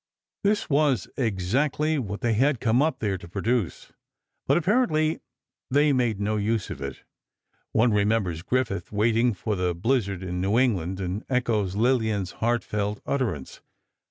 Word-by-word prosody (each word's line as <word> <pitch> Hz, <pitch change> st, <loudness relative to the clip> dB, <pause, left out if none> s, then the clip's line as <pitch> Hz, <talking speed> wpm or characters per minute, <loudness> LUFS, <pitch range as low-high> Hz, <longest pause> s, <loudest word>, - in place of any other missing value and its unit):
This 205 Hz, +1 st, +1 dB
was 140 Hz, -, +2 dB
exactly 135 Hz, -, 0 dB
what 105 Hz, -5 st, -5 dB
they 115 Hz, -1 st, +1 dB
had 130 Hz, +3 st, +2 dB
come 120 Hz, +2 st, +2 dB
up 160 Hz, +2 st, +1 dB
there 100 Hz, -4 st, -2 dB
to 95 Hz, -, -11 dB
produce, 115 Hz, +1 st, -2 dB, 0.6 s
but -, -, +4 dB
apparently 170 Hz, -5 st, +2 dB, 0.5 s
they 145 Hz, +2 st, +4 dB
made 120 Hz, -6 st, +1 dB
no 105 Hz, +1 st, 0 dB
use 105 Hz, 0 st, -1 dB
of -, -, -7 dB
it. 70 Hz, -1 st, -6 dB, 0.7 s
One 115 Hz, 0 st, +3 dB
remembers 100 Hz, -5 st, +1 dB
Griffith 100 Hz, -4 st, -1 dB
waiting 115 Hz, +2 st, +2 dB
for 105 Hz, +3 st, -2 dB
the 90 Hz, -2 st, -1 dB
blizzard 100 Hz, -2 st, 0 dB
in 90 Hz, -1 st, -3 dB
New 100 Hz, +4 st, +1 dB
England, 95 Hz, -8 st, +1 dB
and 95 Hz, +3 st, -3 dB
echoes 110 Hz, -7 st, 0 dB
Lillian's 110 Hz, -5 st, +1 dB
heartfelt 105 Hz, -3 st, -1 dB
utterance. 120 Hz, -, -2 dB
110 Hz, 145 wpm, -25 LUFS, 100-130 Hz, 0.7 s, but